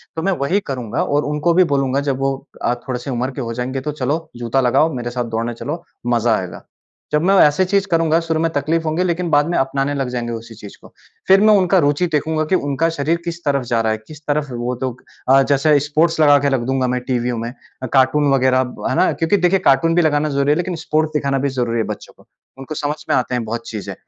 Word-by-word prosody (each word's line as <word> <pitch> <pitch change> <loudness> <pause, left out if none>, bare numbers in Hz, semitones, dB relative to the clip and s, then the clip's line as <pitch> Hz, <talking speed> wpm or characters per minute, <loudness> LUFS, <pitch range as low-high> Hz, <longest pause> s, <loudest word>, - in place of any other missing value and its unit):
तो 160 - -3
मैं 195 - +1
वही 175 +9 +1
करूँगा 125 -2 -2
और 145 +1 0
उनको 150 +3 0
भी 185 +2 +5
बोलूँगा 135 -1 +1
जब 135 -1 -1
वो 135 0 0 0.3
अ, - - +1
थोड़े-से 125 0 -4
उम्र 125 +2 -2
के 135 - -6
हो 115 -2 -4
जाएँगे 130 +3 -3
तो 150 - -3
चलो 150 +3 -3
जूता 120 +2 0
लगाओ 135 +6 +2
मेरे 120 -1 -4
साथ 125 0 -2
दौड़ने 115 +1 -2
चलो, 150 +8 -6 0.2
मज़ा 120 -1 +2
आएगा। 90 -2 -7 0.5
जब 150 0 +2
मैं 195 +2 +4
ऐसे 150 +5 +3
चीज़ 200 +1 +1
करूँगा 165 -1 +3
शुरू 165 -1 -1
में 165 +1 +1
तकलीफ़ 160 +3 0
होगी 160 +3 0
लेकिन 175 -1 -1
बाद 145 -1 +3
में 175 - 0
अपनाने 135 +1 0
लग 135 -3 -2
जाएँगे 120 -1 -3
उसी 115 0 -8
चीज़ 105 -2 -12
को। - - -17 0.3
फिर 195 +1 +6
मैं 215 0 +6
उनका 190 0 +3
रुचि 145 +5 +1
देखूँगा 155 +1 0
कि - - +5
उनका 145 0 0
शरीर 160 +1 -1
किस 170 0 -5
तरफ 140 -2 +1
जा 115 -1 0
रहा 110 -1 0
है 110 - -1
किस 155 -1 -12
तरफ 145 0 0
वो 120 +1 -3
लोग 130 -1 -4 0.3
अ, 135 +1 +6
जैसे 145 +2 +4
स्पोर्ट्स 155 +3 +1
लगा 145 -2 +6
के 140 0 +1
रख 125 - -1
दूँगा 130 -1 +1
मैं 125 0 -1
टीवीओं 125 -2 -1
में, 115 +1 -4 0.3
अ, - - -1
कार्टून 140 +2 +3
वग़ैरह, 130 -1 +3 0.3
है - - -1
ना? 185 - +3
क्योंकि 165 +5 +1
देखिए 185 +1 +2
कार्टून 150 +5 +3
भी 175 - +4
लगाना 155 -1 +1
ज़रूरी 140 0 +1
है - - +3
लेकिन 180 0 -2
स्पोर्ट्स 155 0 0
दिखाना 140 -2 0
भी 140 +1 0
ज़रूरी 120 -1 0
है 115 - +1
बच्चों - - -14
को। - - -23 0.3
उनको 135 +3 -7
समझ 150 0 -2
में - - +3
आता 125 0 0
हैं 120 - -1
बहुत 115 +1 -5
चीज़ें। 110 -3 -6
140 Hz, 245 wpm, -19 LUFS, 125-160 Hz, 0.5 s, फिर